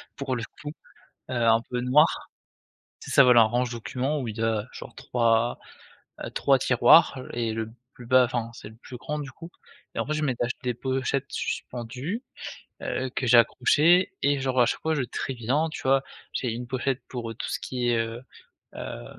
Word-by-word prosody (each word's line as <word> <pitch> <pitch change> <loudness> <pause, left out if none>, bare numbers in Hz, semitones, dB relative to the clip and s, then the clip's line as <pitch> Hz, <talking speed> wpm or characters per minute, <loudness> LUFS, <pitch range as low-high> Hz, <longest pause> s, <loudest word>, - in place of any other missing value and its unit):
pour 135 -2 -3
le 115 - -4 0.2
coup, 150 0 -5 0.6
heu, - - -3
un 115 0 +5
peu 125 -1 -2
noir. 150 +6 +3 0.7
C'est - - -9
ça, 140 - +7
voilà, 125 -2 +7
un - - +6
range-documents 125 +4 -2
où 120 - -4
il 110 - -6
y - - -1
a 110 -1 0
genre 120 - -10
3, 115 -1 +1 0.7
heu, - - -4
3 - - +3
tiroirs - - +5
et 115 -2 -1
le 110 0 -4 0.2
plus 120 - -12
bas 130 0 +6
enfin, 120 -1 -3
c'est - - -10
le 110 - -15
plus 125 +2 -11
grand, 150 +5 -4
du 140 -2 -6
coup. 165 +5 -12 0.4
Et - - -3
en - - 0
fait, 155 - -1
je 155 0 -1
m'étais 125 -4 0
acheté 125 - -5
des 125 -1 0
pochettes 130 +2 -1
suspendues, 130 - -4 0.6
heu, 130 - -2
que 130 - -1
j'ai 120 0 +7
accrochées 155 - +4
et 140 0 +2
genre 130 -1 +1
à 120 - +5
chaque - - -2
fois, 160 0 +1
je 140 - 0
trie 130 +2 -4
bien, 135 +8 0
tu - - -7
vois. 135 +1 +3 0.3
J'ai 125 -3 -1
une 120 +2 -5
pochette 130 +1 -2
pour, 120 -3 -5
heu, - - -7
tout - - -5
ce - - -2
qui 125 -1 -2
est, 120 - +2
heu 115 +1 -3 0.5
heu, - - -6
125 Hz, 205 wpm, -26 LUFS, 115-135 Hz, 0.7 s, ça